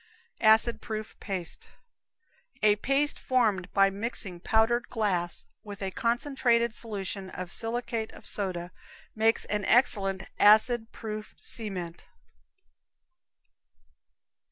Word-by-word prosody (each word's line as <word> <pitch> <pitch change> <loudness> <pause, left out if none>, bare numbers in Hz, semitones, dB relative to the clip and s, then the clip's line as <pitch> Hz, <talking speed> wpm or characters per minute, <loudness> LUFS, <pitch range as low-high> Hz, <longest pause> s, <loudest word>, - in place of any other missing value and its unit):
Acid 220 +2 +5
Proof 215 -1 -6
Paste. 185 -5 -5 0.9
A 210 -1 +6
paste 275 +6 0
formed 215 -8 +1
by 195 -1 +4
mixing 200 -3 -3
powdered 225 +5 +1
glass 190 -7 0 0.2
with 205 -2 -8
a 190 - -2
concentrated 235 -1 +1
solution 195 -4 -5
of 185 -2 -6
silicate 230 -1 -1
of - - -13
soda 180 -3 -2 0.4
makes 225 +1 +2
an 210 -1 -2
excellent 195 -6 +2
acid 220 +2 +5
proof 215 -1 -7
cement. 185 -7 -4
215 Hz, 100 wpm, -28 LUFS, 195-235 Hz, 0.9 s, A